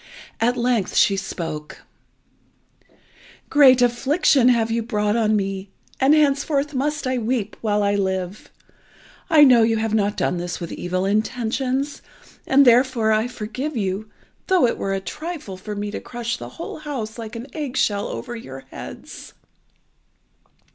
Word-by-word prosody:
At 245 +2 +1
length 240 -5 0
she 200 - +4
spoke 165 -5 -6 1.7
"Great 260 -4 +7
affliction 260 +2 +3
have 230 -2 +2
you 230 +1 0
brought 210 -2 0
on 220 -2 +2
me, 195 -1 -2 0.3
and 275 +3 +5
henceforth 290 0 +1
must 290 +2 -1
I 255 -1 0
weep 225 -2 -2
while 210 -2 +1
I 200 0 +2
live. 190 -1 -2 0.8
I 305 -2 +7
know 250 -4 +7
you 225 0 +3
have 220 0 -1
not 205 -1 +1
done 180 - 0
this 175 0 -4
with 170 -2 -6
evil 185 +1 -2
intentions, 250 +6 -1 0.5
and 275 +1 +5
therefore 240 -2 +4
I 215 +2 +2
forgive 250 +5 -5
you, 200 +1 -2 0.4
though 370 -7 +4
it 235 - -1
were 195 0 -1
a - - -1
trifle 300 - -6
for 210 +3 -7
me 205 0 -4
to - - -4
crush 240 -1 -4
the - - -8
whole 330 - -6
house 250 -7 -5
like 225 0 -7
an 230 +2 -6
egg 290 -5 -4
shell 205 -1 +1
over 240 -1 -6
your 135 - -9
heads." - - -10
230 Hz, 155 wpm, -22 LUFS, 205-260 Hz, 1.7 s, Great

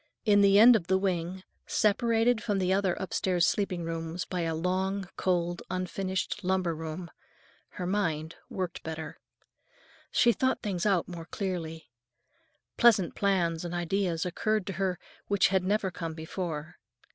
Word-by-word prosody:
In 205 -2 +5
the 200 0 +6
end 235 +3 +9
of 180 -6 -1
the 190 - +3
wing, 185 -1 -2 0.2
separated 230 +2 +2
from 210 -4 -1
the 185 -1 +1
other 190 -2 +1
upstairs 185 -2 0
sleeping 185 -4 0
rooms 165 +1 -4
by 180 -2 -3
a 165 -1 -1
long, 190 +3 -1
cold, 175 -1 0
unfinished 185 +2 -2
lumber 185 -2 0
room, 160 +2 -6 0.7
her 180 - -3
mind 165 -5 -1 0.2
worked 185 -3 -4
better. 160 0 -6 0.9
She 240 - +5
thought 260 +1 0
things 195 -2 -1
out 190 -4 +2
more 170 -2 -7
clearly. 170 - -5 0.9
Pleasant 215 -7 +5
plans 175 -5 +1
and 175 0 -4
ideas 175 -1 0
occurred 215 +3 0
to 195 - -4
her 185 -2 0 0.3
which 200 -1 +3
had 190 -1 +2
never 195 0 0
come 165 -1 -5
before. 160 -1 -5
185 Hz, 145 wpm, -29 LUFS, 170-200 Hz, 0.9 s, end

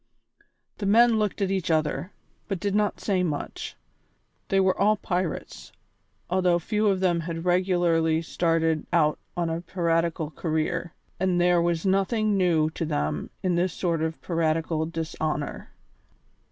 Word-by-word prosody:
The 205 - -2
men 230 +2 +5
looked 210 -1 0
at 195 - 0
each 190 -3 -1
other, 160 +4 0 0.4
but 195 -3 -2
did 200 +1 -1
not 210 0 +1
say 190 -3 0
much. 155 -5 -4 0.7
They 195 - +2
were 190 -1 +3
all 210 +2 +3
pirates, 180 -3 -3 0.6
although 180 -1 +2
few 210 +5 0
of 190 -2 +2
them 175 -2 +2
had 165 0 -5
regularly 175 -3 +2
started 165 -1 0
out 155 -3 +2 0.2
on 170 -2 0
a 165 +1 -2
piratical 165 -3 -1
career, 165 +1 -2 0.2
and 180 -1 +1
there 175 0 +4
was 170 0 0
nothing 205 +3 +2
new 165 -5 +2
to 165 - -4
them 75 - -2
in 185 -1 +1
this 175 0 +1
sort 170 -3 -1
of 160 0 -2
piratical 160 -1 0
dishonour. 160 -2 -3
175 Hz, 145 wpm, -26 LUFS, 160-190 Hz, 0.7 s, men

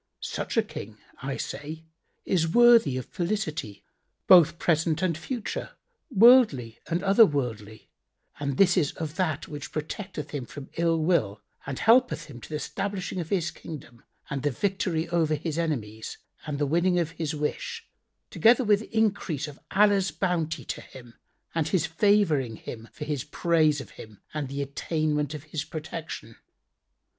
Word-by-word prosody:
Such - - -4
a - - +5
King, 105 +1 -8 0.2
I 135 0 -3
say, 150 +4 -6 0.4
is 165 -3 +2
worthy 235 - +6
of 130 - -4
felicity 170 - -3 0.4
both 170 -2 +7
present 165 0 +1
and 175 -3 +1
future 235 - -5 0.4
worldly 210 - +5
and 175 +2 -1
other 200 +3 +7
worldly, 115 - -2 0.5
and 140 -2 -2
this 190 -1 +5
is 150 -6 +2
of 160 -1 -5
that 160 -5 -1
which 145 -1 -7
protecteth 155 0 -5
him 135 -5 -4
from 145 -2 -10
ill 165 -1 +2
will 110 - +1 0.2
and 135 -1 -3
helpeth 220 -9 +4
him 120 -4 -11
to - - -11
the 155 - -2
stablishing 195 -1 -3
of 165 - -7
his 175 -4 0
Kingdom 125 -7 -10 0.2
and 140 -2 -3
the 145 - +1
victory 175 - -1
over 160 -3 +2
his 160 +2 -3
enemies 110 -10 -3 0.3
and 145 -2 -2
the 145 - +1
winning 175 +5 +2
of 165 -2 0
his 160 -2 -3
wish, 460 - -3 0.5
together 240 +3 +5
with 210 -2 +3
increase 200 -9 0
of 145 -1 -11
Allah's 200 -1 +4
bounty 165 -1 -1
to - - -5
him 120 -3 -13 0.4
and 160 -2 0
His 175 0 +1
favouring 165 - +2
him 115 +1 -9
for 150 - -7
his 145 -4 -2
praise 155 -1 +2
of - - -9
Him 110 -2 -12
and 150 -3 -2
the 140 +1 -2
attainment 150 +1 -1
of 145 - -8
His 155 -1 -4
protection. 155 -6 -7
160 Hz, 160 wpm, -27 LUFS, 140-185 Hz, 0.5 s, both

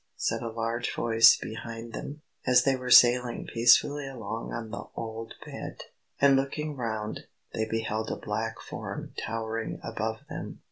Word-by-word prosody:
said - - -1
a 115 - -3
large 115 +1 -2
voice 115 0 +6
behind 115 +1 -7
them, 150 +2 -7 0.2
as 125 -1 +6
they 135 -1 +3
were 125 -1 -5
sailing 125 -1 +6
peacefully 135 +5 +4
along 115 -4 -5
on 115 -2 -5
the 115 - -5
old 115 0 -6
Bed. - - -7 0.4
And 140 -1 +6
looking 145 +3 -1
round, 110 -4 -4 0.3
they 110 - 0
beheld 110 0 -2
a - - -1
black 110 +2 -3
form - - -7
towering 115 0 -3
above - - -3
them. - - -7
115 Hz, 150 wpm, -28 LUFS, 110-125 Hz, 0.4 s, voice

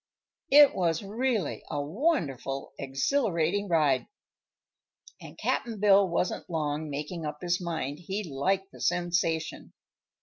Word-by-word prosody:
It 290 0 +8
was 170 -1 0
really 220 - -1
a - - -2
wonderful, 145 - -1
exhilarating 170 - 0
ride, 150 -7 +2 1.1
and - - -11
Cap'n 230 -4 -2
Bill 200 -2 +5
wasn't 175 +2 -2
long 155 -2 -2
making 150 +4 -5
up 150 -1 -4
his 180 0 0
mind 160 -4 -3
he 195 +4 -4
liked 190 +6 -1
the - - -13
sensation. 170 -2 -1
170 Hz, 115 wpm, -28 LUFS, 150-200 Hz, 1.1 s, It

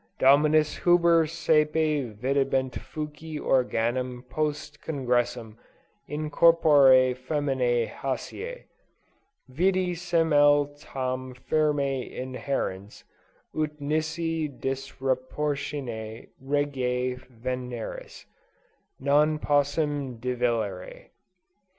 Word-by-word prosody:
Dominus 150 +3 +4
Huber 170 -2 +4
sæpe 150 -5 +1
videbat 135 +1 0
fuci 150 0 -6
organum 125 0 0
post 150 0 -3
congressum, 120 -5 -1 0.5
in 150 +1 -4
corpore 140 -6 +6
feminæ 130 -3 0
hæsisse. 455 - -5 0.8
Vidi 180 +6 +1
semel 150 -4 +3
tam 130 -2 -4
firme 140 -1 0 0.2
inhærens, 125 -6 -4 0.5
ut 150 -1 -2
nisi 160 +2 -1
disruptione 135 -3 -3 0.2
reginæ 130 -3 -1
ventris, 125 -1 -6 0.7
non 150 +3 +3
possim 145 -3 0
divellere. 115 -6 -2
140 Hz, 70 wpm, -26 LUFS, 125-150 Hz, 0.8 s, corpore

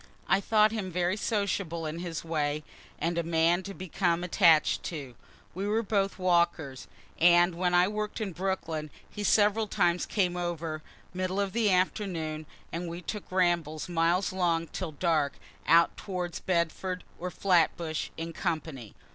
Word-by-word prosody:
I 195 - +3
thought 215 +1 +4
him 205 -5 -3
very 180 +2 +1
sociable 200 -6 -1
in 155 +2 -4
his 170 -2 -4
way, 150 -2 -1 0.3
and 170 +1 -1
a - - 0
man 165 +2 +2
to 195 +1 -7
become 175 -1 -1
attach'd 170 -4 +4
to. 140 -7 -5 0.4
We 195 +3 -3
were 220 +2 +1
both 200 -2 0
walkers, 170 -7 +1 0.3
and 175 +1 +6
when 175 +1 +1
I 180 +1 +5
work'd 210 +1 -3
in 210 -3 -2
Brooklyn 165 -4 -3 0.2
he 210 - -6
several 210 +1 +3
times 175 -2 +1
came 180 -4 0
over, 165 -3 -3 0.3
middle 185 +1 -2
of 200 0 -1
afternoons, 185 -7 0 0.2
and 170 +1 -4
we 170 +2 -7
took 210 0 -6
rambles 175 -4 +1
miles 175 +3 +1
long, 170 -3 +1
till 180 -5 -5
dark, 155 -2 +1 0.3
out 170 +1 +5
towards 180 -3 -4
Bedford 180 +1 -1 0.2
or 180 - -3
Flatbush, 170 -3 +1
in 165 +1 -5
company. 155 - -4
175 Hz, 150 wpm, -29 LUFS, 165-190 Hz, 0.4 s, and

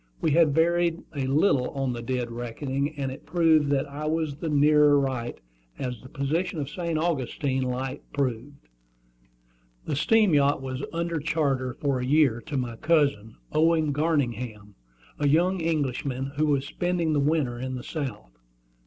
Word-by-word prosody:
We 160 - +1
had 155 -2 +4
varied 170 +1 +2
a 135 -2 -1
little 135 -2 +2
on 135 -2 -2
the 120 - -5
dead 125 -1 -2
reckoning, 135 +5 -3
and 135 -2 -2
it 130 - -11
proved 160 -3 +3
that 140 0 +1
I 145 +2 -5
was 155 -2 -1
the 165 0 -3
nearer 150 0 +5
right, 130 -3 -3 0.4
as 125 -3 -4
the 130 - -12
position 160 +6 -2
of 145 0 -4
St. 170 0 -2
Augustine 140 -4 -1
Light 130 +2 -3
proved. 140 - -3 1.2
The - - -2
steam 210 +5 +3
yacht 145 -1 +3
was 130 0 -5
under 170 -1 -2
charter 140 -5 -1
for 140 -3 -1
a - - -3
year 135 -3 +3
to 145 - -2
my 120 -3 -3
cousin, 140 -9 +1 0.2
Owen 160 -1 +3
Garningham, 125 -9 -1 0.5
a 145 - +2
young 175 +6 +3
Englishman, 140 -4 -1
who 155 +1 +1
was 140 -2 +1
spending 175 0 -1
the 145 - +2
winter 140 -5 0
in 130 +1 -4
the 125 - -6
South. 125 - -5
145 Hz, 160 wpm, -26 LUFS, 130-160 Hz, 1.2 s, nearer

